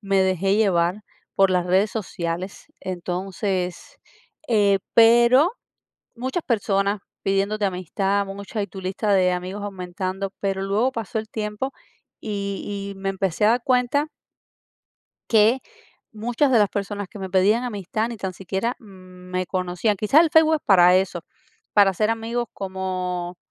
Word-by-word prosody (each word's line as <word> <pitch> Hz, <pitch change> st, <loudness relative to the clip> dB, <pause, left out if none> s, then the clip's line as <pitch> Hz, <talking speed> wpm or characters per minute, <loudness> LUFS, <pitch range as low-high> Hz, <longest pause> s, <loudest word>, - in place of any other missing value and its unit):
me 195 Hz, -2 st, +2 dB
dejé 190 Hz, +1 st, +1 dB
llevar 190 Hz, -2 st, +2 dB, 0.3 s
por 195 Hz, -1 st, +4 dB
las 180 Hz, -1 st, +1 dB
redes 190 Hz, +4 st, +3 dB
sociales. 180 Hz, -3 st, -4 dB
Entonces, 185 Hz, 0 st, -4 dB, 0.5 s
eh, 205 Hz, -4 st, +3 dB, 0.2 s
pero, 235 Hz, -, +6 dB, 0.6 s
muchas 260 Hz, +8 st, -3 dB
personas 200 Hz, -3 st, 0 dB, 0.2 s
pidiéndote 200 Hz, +2 st, 0 dB
amistad, 195 Hz, +2 st, -1 dB
muchas, 200 Hz, +2 st, -5 dB
y -, -, -5 dB
tu 195 Hz, -, -9 dB
lista 190 Hz, +3 st, -2 dB
de 185 Hz, -2 st, +4 dB
amigos 185 Hz, +3 st, -4 dB
aumentando. 190 Hz, 0 st, -4 dB
Pero 195 Hz, -1 st, -1 dB
luego 205 Hz, +6 st, +1 dB
pasó 225 Hz, -4 st, -4 dB
el 220 Hz, 0 st, -4 dB
tiempo, 210 Hz, +5 st, -3 dB, 0.5 s
y 200 Hz, -1 st, -4 dB
y -, -, -16 dB
me 195 Hz, 0 st, -2 dB
empecé 195 Hz, 0 st, 0 dB
a -, -, +6 dB
dar 240 Hz, +1 st, +2 dB
cuenta 255 Hz, +4 st, +2 dB, 1.2 s
que 225 Hz, +3 st, +5 dB, 0.5 s
muchas 240 Hz, +6 st, 0 dB
de 240 Hz, -, +5 dB
las 205 Hz, -2 st, +3 dB
personas 200 Hz, 0 st, -4 dB
que 205 Hz, -, -10 dB
me 190 Hz, -1 st, -5 dB
pedían 200 Hz, +6 st, +3 dB
amistad, 215 Hz, -1 st, -2 dB
ni 235 Hz, -, -6 dB
tan 190 Hz, -2 st, -4 dB
siquiera 195 Hz, +6 st, -3 dB
me 185 Hz, -3 st, -7 dB
conocían. 185 Hz, +3 st, -1 dB
Quizás, 220 Hz, -, +5 dB
el 335 Hz, -, +2 dB
Facebook 320 Hz, 0 st, +5 dB
es 305 Hz, -, -4 dB
para 180 Hz, -2 st, +6 dB
eso, 185 Hz, -2 st, -1 dB, 0.5 s
para 200 Hz, -2 st, +6 dB
hacer 210 Hz, +4 st, 0 dB
amigos, 230 Hz, +1 st, -2 dB
como 185 Hz, -2 st, -4 dB
200 Hz, 145 wpm, -23 LUFS, 185-220 Hz, 1.2 s, pero